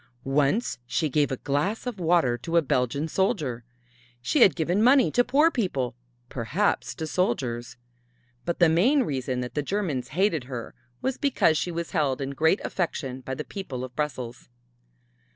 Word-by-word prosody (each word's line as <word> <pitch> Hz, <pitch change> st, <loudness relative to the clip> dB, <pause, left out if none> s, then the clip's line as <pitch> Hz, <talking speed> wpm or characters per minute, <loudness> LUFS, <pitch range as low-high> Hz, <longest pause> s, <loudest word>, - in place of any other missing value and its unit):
Once 145 Hz, -, +1 dB
she 155 Hz, +3 st, 0 dB
gave 145 Hz, 0 st, +1 dB
a 130 Hz, -, -1 dB
glass 150 Hz, -, -1 dB
of 245 Hz, -6 st, -4 dB
water 165 Hz, -8 st, +3 dB
to 165 Hz, +8 st, -1 dB
a -, -, +6 dB
Belgian 130 Hz, +3 st, 0 dB
soldier. 155 Hz, -, -1 dB, 0.6 s
She 125 Hz, +1 st, 0 dB
had 195 Hz, -, +7 dB
given 175 Hz, +4 st, +1 dB
money 255 Hz, +3 st, +5 dB
to 245 Hz, -, +4 dB
poor 290 Hz, +7 st, +4 dB
people, 160 Hz, -, -1 dB, 0.3 s
perhaps 145 Hz, -, -1 dB
to 160 Hz, -, -4 dB
soldiers. 120 Hz, -6 st, -1 dB, 0.7 s
But 170 Hz, -, -2 dB
the 175 Hz, -, +5 dB
main 235 Hz, -, +4 dB
reason 130 Hz, -, -2 dB
that 125 Hz, -, -5 dB
the 150 Hz, -, 0 dB
Germans 155 Hz, -6 st, -2 dB
hated 185 Hz, -9 st, +2 dB
her 125 Hz, -3 st, -6 dB, 0.3 s
was 265 Hz, -1 st, -1 dB
because 265 Hz, -, +3 dB
she 165 Hz, -, -1 dB
was 170 Hz, -1 st, -4 dB
held 140 Hz, -4 st, +1 dB
in 135 Hz, 0 st, -3 dB
great 160 Hz, +7 st, +2 dB
affection 135 Hz, -7 st, -3 dB
by 130 Hz, +1 st, -5 dB
the -, -, -4 dB
people 140 Hz, -11 st, -6 dB
of 125 Hz, -1 st, -8 dB
Brussels. 125 Hz, -, -4 dB
150 Hz, 170 wpm, -26 LUFS, 130-190 Hz, 0.7 s, had